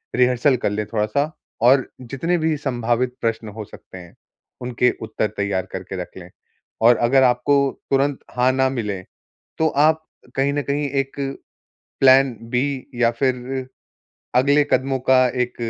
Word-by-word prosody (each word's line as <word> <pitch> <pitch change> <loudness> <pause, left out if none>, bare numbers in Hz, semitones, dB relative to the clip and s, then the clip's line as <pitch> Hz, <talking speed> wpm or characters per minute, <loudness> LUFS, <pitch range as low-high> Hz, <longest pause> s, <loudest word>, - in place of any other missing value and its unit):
Rehearsal 125 +2 +3
कर - - +3
लें 105 0 -2
थोड़ा-सा, 115 +8 -1 0.3
और 130 +2 +5
जितने 140 +8 -1
भी 160 -1 0
सँभावित 125 -2 -1
प्रश्न 115 -1 -2
हो 110 - -5
सकते 95 - -13
हैं, 90 -1 -13 0.5
उनके 125 0 +1
उत्तर 110 -1 -1
तैयार 100 -2 -1
करके 95 0 -5
रख 90 - -10
लें। 90 -1 -10 0.5
और 120 +1 +6
अगर 130 +3 +3
आपको 125 +3 +3 0.4
तुरंत 140 0 +1 0.2
हाँ 125 +1 +3
ना 130 0 +2
मिले, 105 -7 -3 0.6
तो 160 0 +3
आप 155 +2 +2 0.3
कहीं 140 +1 +1
न 145 - 0
कहीं 145 +1 -1
एक 135 - -17 0.8
प्लान 130 -1 +5 0.2
बी 130 +1 -1
या 120 -1 +3
फिर 130 +1 -2 0.7
अगले 140 +3 +4
कदमों 135 +1 +1
का 130 -1 +6 0.2
एक 125 0 -5
125 Hz, 150 wpm, -21 LUFS, 115-135 Hz, 0.8 s, और